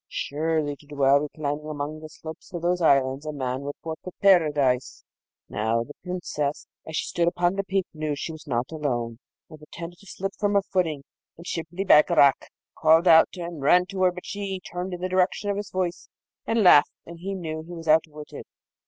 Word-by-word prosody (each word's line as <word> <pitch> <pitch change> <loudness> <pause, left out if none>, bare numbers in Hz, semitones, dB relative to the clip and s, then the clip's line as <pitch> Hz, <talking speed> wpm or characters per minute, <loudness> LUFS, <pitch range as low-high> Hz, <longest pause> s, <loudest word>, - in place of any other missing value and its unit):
Surely, 155 0 -1
to 145 - -20
dwell 140 -1 +3
reclining 150 0 -4
among 150 0 -4
the 155 0 -10
slopes 160 +3 -10
of 170 - -5
those 180 +1 +1
islands 135 -2 +3
a 155 - -4
man 130 -2 -3
would 145 +1 -5
forfeit 165 +2 -7
Paradise! 150 -10 +3 0.4
Now, 110 +2 0
the 145 - -11
Princess, 170 -5 -3 0.2
as 160 - -6
she - - -1
stood 170 -1 0
upon 175 0 +1
the 200 0 -2
peak, 195 -1 -1
knew 155 -1 -4
that 145 - -1
she 165 - -4
was 155 0 -11
not 120 0 -1
alone, 120 -7 -3 0.3
and 155 -2 -13
pretended 170 +3 -9
to 200 - -18
slip 195 +2 -4
from 205 -1 +1
her 200 - +4
footing, 165 -8 -1 0.3
and 170 - -12
Shibli 170 +2 -4
Bagarag 145 -4 +5 0.3
called 160 +2 +4
out 160 -1 +7
and 170 -4 -6
ran 180 +6 +5
to 190 -1 -4
her; 185 -1 +5
but 180 0 -10
she 200 -2 -4
turned 180 +1 -5
in 175 - -10
the 185 - -1
direction 185 +2 +1
of 200 - -3
his 205 0 -5
voice 180 -2 -3 0.4
and 225 -1 +2
laughed, 160 -6 +7
and 170 0 -11
he 195 +3 -4
knew 160 -4 -5
he 170 +2 -10
was 165 -1 -9
outwitted. 155 -1 0
160 Hz, 200 wpm, -25 LUFS, 145-180 Hz, 0.4 s, out